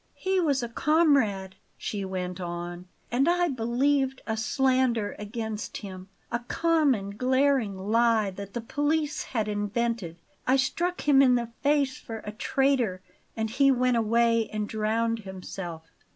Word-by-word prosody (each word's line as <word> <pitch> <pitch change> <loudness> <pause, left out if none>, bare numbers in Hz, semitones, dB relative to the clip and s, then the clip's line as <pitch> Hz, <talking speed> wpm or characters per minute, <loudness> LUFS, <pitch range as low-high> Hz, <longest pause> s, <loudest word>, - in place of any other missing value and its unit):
"He 380 0 0
was 285 -7 +1
a - - -2
comrade," 235 - +2 0.2
she 205 -2 -4
went 185 -1 -4
on; 175 +1 -5 0.2
"and 270 +6 +3
I 350 0 +2
believed 265 +2 +1
a 220 - -1
slander 250 -1 +1
against 220 0 -5
him, 190 -2 -9 0.2
a 235 - 0
common 275 -6 +1
glaring 255 -2 +1
lie 220 +1 +2
that 200 +2 -9
the 240 - -2
police 295 +5 0
had 220 -4 -2
invented. 205 -3 -2 0.3
I 260 - +5
struck 340 +7 0
him 280 -2 +5
in 255 -2 +5
the 235 -1 -1
face 285 -2 +2
for 225 -1 -8
a 210 - -4
traitor; 240 -4 0 0.3
and 220 0 0
he 275 +3 +4
went 250 -1 +3
away 230 0 +2
and 215 -1 -2
drowned 225 +2 0
himself. 185 -4 -7
230 Hz, 145 wpm, -27 LUFS, 205-270 Hz, 0.3 s, I